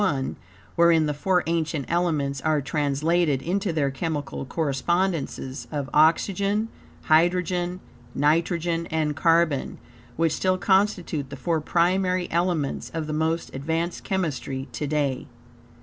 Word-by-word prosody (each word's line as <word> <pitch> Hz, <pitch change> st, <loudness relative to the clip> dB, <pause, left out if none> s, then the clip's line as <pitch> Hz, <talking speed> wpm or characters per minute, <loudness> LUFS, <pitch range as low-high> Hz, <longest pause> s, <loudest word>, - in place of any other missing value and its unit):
I, 140 Hz, -9 st, 0 dB, 0.5 s
wherein 170 Hz, -2 st, +5 dB
the 150 Hz, -, 0 dB
four 180 Hz, +5 st, +1 dB
ancient 160 Hz, -3 st, -1 dB
elements 155 Hz, -6 st, 0 dB
are 155 Hz, -1 st, +2 dB
translated 150 Hz, +1 st, 0 dB
into 190 Hz, +2 st, -1 dB
their 145 Hz, -4 st, 0 dB
chemical 145 Hz, -1 st, -3 dB
correspondences 155 Hz, -1 st, -1 dB
of 145 Hz, -3 st, -3 dB
oxygen, 200 Hz, +7 st, +3 dB, 0.3 s
hydrogen, 175 Hz, +2 st, +2 dB, 0.3 s
nitrogen 165 Hz, +3 st, +1 dB
and 155 Hz, -2 st, -1 dB
carbon, 165 Hz, -2 st, +2 dB, 0.4 s
which 165 Hz, 0 st, +1 dB
still 185 Hz, 0 st, +1 dB
constitute 185 Hz, -7 st, +1 dB
the 140 Hz, -, -7 dB
four 160 Hz, +4 st, -1 dB
primary 180 Hz, +3 st, +1 dB
elements 170 Hz, -4 st, 0 dB
of 160 Hz, -1 st, -2 dB
the 155 Hz, -, -4 dB
most 160 Hz, +2 st, -1 dB
advanced 165 Hz, +5 st, -2 dB
chemistry 145 Hz, -7 st, -2 dB
to 150 Hz, -, -3 dB
day. 140 Hz, -3 st, -1 dB
160 Hz, 120 wpm, -25 LUFS, 145-175 Hz, 0.5 s, wherein